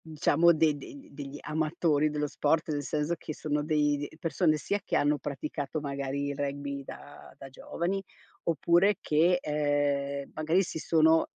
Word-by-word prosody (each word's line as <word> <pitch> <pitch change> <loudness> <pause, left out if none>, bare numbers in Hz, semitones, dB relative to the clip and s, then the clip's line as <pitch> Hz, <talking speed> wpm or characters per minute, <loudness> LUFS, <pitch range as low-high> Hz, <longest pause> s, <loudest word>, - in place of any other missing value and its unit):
Diciamo 160 +1 +3
de 160 -2 +3
de 140 - -10
de 275 - -15
degli 140 0 -8
amatori 155 -1 +1
dello 150 0 -1
sport, 155 +3 0
nel 145 -1 -1
senso 150 +4 -1
che 155 - -6
sono 150 -1 -1
dei 150 -1 +2
de 145 +2 -7
persone 165 -1 +1
sia 200 +6 -1
che - - -2
hanno 145 0 +2
praticato 145 +1 -4
magari 140 -1 -3
il 140 - -3
rugby 140 0 -3
da 145 +1 -11
da 135 - -10
giovani 175 +8 -3 0.4
oppure 170 +5 +3
che, 165 +4 +3
ehm, 145 -2 -1
magari 160 +5 +2
si 160 - -5
sono 160 0 +4
150 Hz, 165 wpm, -29 LUFS, 145-160 Hz, 0.4 s, sono